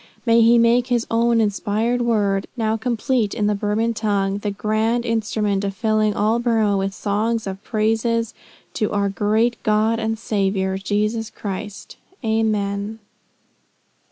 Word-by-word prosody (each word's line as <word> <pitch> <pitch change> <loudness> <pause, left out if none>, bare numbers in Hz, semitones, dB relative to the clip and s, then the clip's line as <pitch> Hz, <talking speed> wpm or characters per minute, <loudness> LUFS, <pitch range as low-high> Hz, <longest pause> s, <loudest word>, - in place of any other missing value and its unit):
May 230 -1 +5
he 230 +1 +6
make 235 +1 +3
his 240 -2 0
own 230 0 +3
inspired 220 +3 0
word, 205 -4 +1
now 220 -1 0
complete 230 -1 -1
in 210 - 0
the 210 - +2
Burman 210 +3 0
tongue, 200 -3 -1
the 205 - -2
grand 220 +4 0
instrument 215 -3 -1
of 195 -1 -3
filling 215 -1 +1
all 220 +3 +1
Burmah 225 -4 +2
with 195 0 -1
songs 220 +2 -1
and 195 0 -6
praises 225 +1 0 0.4
to 210 - -1
our 200 -1 0
great 215 +4 0
God 215 +2 +2
and 225 0 -1
Saviour, 195 -3 -1
Jesus 215 +3 -1
Christ 200 0 -7 0.3
Amen." 215 -1 -1
215 Hz, 140 wpm, -21 LUFS, 205-230 Hz, 0.4 s, he